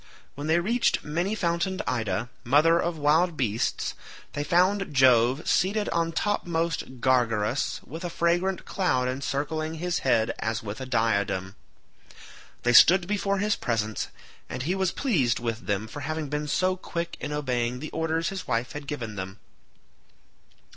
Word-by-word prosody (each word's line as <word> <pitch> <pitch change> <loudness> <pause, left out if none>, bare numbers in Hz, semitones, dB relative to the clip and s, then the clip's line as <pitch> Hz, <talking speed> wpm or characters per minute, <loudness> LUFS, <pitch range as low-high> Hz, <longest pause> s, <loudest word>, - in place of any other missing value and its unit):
When 145 +2 -6
they 160 +2 +4
reached 235 +7 +1
many 175 +7 -1
fountained 175 -1 -1
Ida, 110 -2 -1 0.2
mother 155 +7 +4
of 170 -1 -1
wild 155 +3 +2
beasts, 115 -3 -1 0.4
they 145 - -2
found 185 +3 +2
Jove 130 +1 +4
seated 205 +3 +2
on 165 0 0
topmost 165 -8 -1
Gargarus 120 -2 +1
with 160 +6 -8
a 175 - -2
fragrant 175 +3 0
cloud 130 -10 0
encircling 145 +4 -2
his 175 +2 -1
head 115 -4 +2
as 110 0 -2
with 105 +4 -6
a 130 - -5
diadem. 100 -5 0 1.1
They 120 - +3
stood 175 +8 +8
before 200 0 0
his 210 +2 +1
presence, 110 -3 -2 0.4
and 125 - -4
he 170 +6 0
was 190 -2 0
pleased 150 - +1
with 115 -1 -4
them 100 0 0
for 130 - -8
having 155 +1 -3
been 150 +1 -2
so 185 +5 +1
quick 170 -2 -5
in - - -4
obeying 125 -4 -1
the 150 +4 -7
orders 160 +1 -1
his 190 -3 -6
wife 115 -1 -1
had 145 -1 -7
given 115 -8 -5
them. 95 +1 -6
150 Hz, 155 wpm, -26 LUFS, 120-175 Hz, 1.1 s, stood